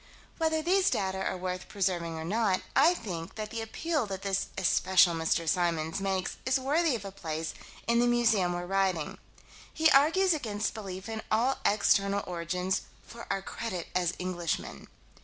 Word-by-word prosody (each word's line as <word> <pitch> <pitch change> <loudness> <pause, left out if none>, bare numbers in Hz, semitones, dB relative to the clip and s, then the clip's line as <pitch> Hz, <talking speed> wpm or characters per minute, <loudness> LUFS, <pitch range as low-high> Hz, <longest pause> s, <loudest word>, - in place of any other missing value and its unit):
Whether 320 -1 +1
these 380 +3 +3
data 190 -1 -1
are 185 - -2
worth 180 0 -4
preserving 175 -4 -1
or 160 - -5
not, 205 0 +1
I 320 +6 +6
think 170 - -6
that 215 -1 -5
the 230 - -3
appeal 295 +3 -2
that 195 -1 -5
this 195 -1 0
especial 185 -1 +4
Mr. 165 0 0
Symons 165 0 0
makes 190 -1 -1
is 265 +1 +2
worthy 295 +2 +2
of 210 -4 -6
a 195 - -5
place 160 -4 -4 0.3
in 235 0 +3
the 240 - +4
museum 225 -7 +3
we're 175 0 -3
writing. 190 -4 0 0.5
He 320 -1 +3
argues 330 +7 +5
against 220 -8 -2
belief 195 -2 -7
in 220 -1 -4
all 240 +5 +2
external 200 -1 +2
origins 180 +2 -2 0.2
"for 235 0 -10
our 195 -1 -1
credit 185 -7 -5
as 180 -1 0
Englishmen." 175 -3 -3
195 Hz, 165 wpm, -29 LUFS, 180-235 Hz, 0.5 s, I